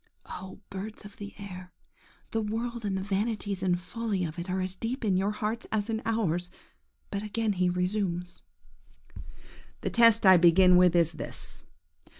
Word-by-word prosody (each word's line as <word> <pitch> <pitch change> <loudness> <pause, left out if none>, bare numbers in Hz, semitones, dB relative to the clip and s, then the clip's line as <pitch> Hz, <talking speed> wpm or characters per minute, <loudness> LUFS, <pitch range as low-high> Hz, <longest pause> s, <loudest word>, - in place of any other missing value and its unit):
–Oh, 190 +1 -8
birds 210 +3 -6
of 205 - -12
the 205 -1 -8
air, 185 -3 -9 0.6
the 225 - 0
world 225 +2 -3
and 195 -2 0
the 190 - -3
vanities 205 -1 -2
and 180 -2 +1
follies 200 -1 -2
of 160 +2 -8
it 175 +2 -5
are 185 +1 0
as 185 0 -2
deep 235 +5 -3
in 195 -3 +2
your 190 +2 +1
hearts 215 +2 -3
as 220 +1 0
in 220 0 -1
ours! 180 -6 0 0.6
But 200 - -2
again 215 +1 -1
he 180 -1 +1
resumes– 180 -1 -2 1.4
"The - - -2
test 230 -2 +5
I 190 -1 +9
begin 180 +2 +6
with 180 -1 +5
is 170 -1 +4
this. - - -7
195 Hz, 165 wpm, -29 LUFS, 180-220 Hz, 1.4 s, I